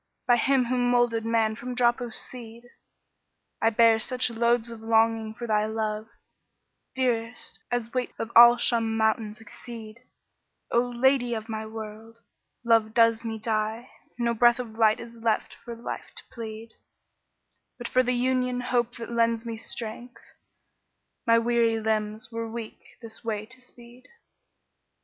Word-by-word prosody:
* - - -53
By 245 -1 +5
him 265 0 +2
who 250 +1 0
moulded 240 -2 +2
man 225 -1 +2
from 245 +3 -6
drop 240 0 +2
o' 240 - -4
seed, 230 0 -9 1.0
I 225 - +4
bear 225 0 +5
such 250 +2 0
loads 235 0 +1
of 225 -1 -9
longing 225 -1 +2
for 240 - -6
thy 215 -1 +1
love, 215 0 -3 0.5
* - - -45
Dearest, 245 -2 -2
as 240 -1 -2
weight 255 -1 -1
of 225 - -4
al 240 +1 +10
Shumm 230 -2 +1
Mounts 220 -1 0
exceed: 225 0 -10 0.7
O 235 - +4
'Lady 245 0 +2
of 220 0 -6
my 220 -1 -4
World'[FN#12] 220 +1 -9 0.5
Love 225 -2 +3
does 230 -1 +4
me 225 -1 -4
die; 220 +2 -2
* - - -38
No 235 -1 +1
breath 240 +1 +5
of 245 -3 -5
life 220 -1 +3
is 235 0 -10
left 225 -1 -1
for 235 -1 -7
life 230 - -7
to - - -8
plead; 225 -2 -8 1.0
But 240 - -5
for 255 - +3
the 250 0 0
union 250 0 0
hope 245 -1 0
that 235 0 -7
lends 230 0 +1
me 230 -1 -4
strength, 230 +2 -7 0.6
* - - -50
My 230 0 +6
weary 230 -1 +2
limbs 215 0 -2
were 230 0 -4
weak 230 -1 -9
this 225 +1 -9
way 215 -2 -3
to 255 +3 -8
speed." 245 0 -16
230 Hz, 160 wpm, -26 LUFS, 220-240 Hz, 1.0 s, al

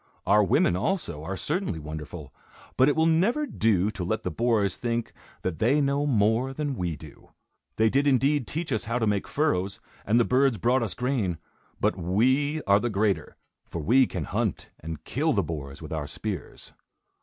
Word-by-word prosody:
Our 105 0 +5
women, 90 -2 +3
also, 90 - -2
are 95 +4 -4
certainly 165 - -2
wonderful; 75 -1 -8 0.4
but 130 +2 +5
it 145 - +1
will 160 0 +3
never 195 - +2
do 105 - +1
to 100 -4 -5
let 110 +6 -2
the 90 - -2
boars 110 0 +1
think 120 -1 -2 0.3
that 85 -4 -3
they 130 +7 +3
know 140 +1 +1
more 115 +2 +2
than 145 0 -2
we 90 -6 -2
do. 75 -1 -14 0.5
They 110 - +3
did 140 +5 +2
indeed 140 0 +2
teach 160 0 -4
us 110 +2 -1
how 115 +2 -1
to 115 - +1
make 105 -2 0
furrows, 100 -11 0 0.2
and 110 +4 +3
the 120 - +4
birds 130 -2 +3
brought 120 +6 +2
us 110 -5 -3
grain; 120 -9 -1 0.4
but - - +1
we 130 - +1
are 100 0 +4
the 120 - -1
greater, 100 -6 0 0.3
for 85 - -4
we 125 - +5
can - - -4
hunt - - -2
and 80 -1 -7
kill 150 - 0
the 100 - +1
boars 75 -2 -6
with 80 - -6
our 75 -2 -3
spears. 100 -3 -6
110 Hz, 190 wpm, -26 LUFS, 90-135 Hz, 0.5 s, Our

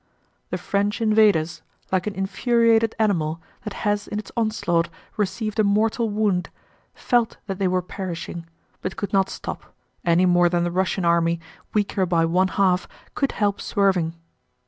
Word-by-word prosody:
The - - -2
French 205 +2 -1
invaders, 210 -7 +3 0.3
like 185 +1 +1
an 205 - -3
infuriated 225 +3 +2
animal 170 -7 +1 0.3
that 210 - -4
has 205 -1 0
in 210 - -4
its 210 - -6
onslaught 215 -7 +1 0.3
received 215 +2 -2
a - - +5
mortal 215 +3 +2
wound, 205 -4 0 0.5
felt 240 -3 +1
that 195 -2 -5
they 195 - +2
were 185 0 +1
perishing, 170 -2 -6 0.3
but 185 - -4
could 205 - -4
not 195 -1 +3
stop, - - -7 0.3
any 175 +2 +4
more 175 -1 +4
than 175 0 +1
the 175 - -1
Russian 185 0 0
army, 170 0 +2 0.4
weaker 200 -2 +1
by 165 -1 +3
one 180 +3 +2
half, 190 -2 +1 0.3
could 275 - 0
help 205 -1 0
swerving. 190 -5 +1
195 Hz, 155 wpm, -23 LUFS, 175-215 Hz, 0.5 s, a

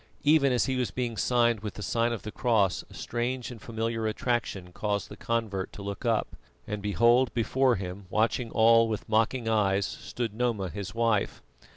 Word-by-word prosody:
Even 145 -2 +5
as 125 - +2
he 130 -1 -1
was 125 -2 0
being 120 -2 -3
signed 120 0 +2
with 105 -1 -6
the 105 - -6
sign 115 +2 +1
of 115 - -4
the 105 - -6
cross, 105 -7 +1
a - - -14
strange 125 +1 -3
and 115 -3 -10
familiar 115 0 -2
attraction 110 -5 -2
caused 100 -1 -2
the - - -9
convert 110 -5 -2
to 100 - -8
look 100 +4 -5
up, 115 -2 0 0.3
and 105 -1 -4
behold, 115 +6 +3
before 125 +2 +2
him, 95 0 -6
watching 115 +3 +1
all 115 0 +5
with 110 -2 -4
mocking 115 +2 +1
eyes, 100 -3 +2
stood 115 +2 -5
Noma 110 -5 -1
his 100 +3 -6
wife. 115 -3 0
115 Hz, 185 wpm, -28 LUFS, 105-120 Hz, 0.3 s, Even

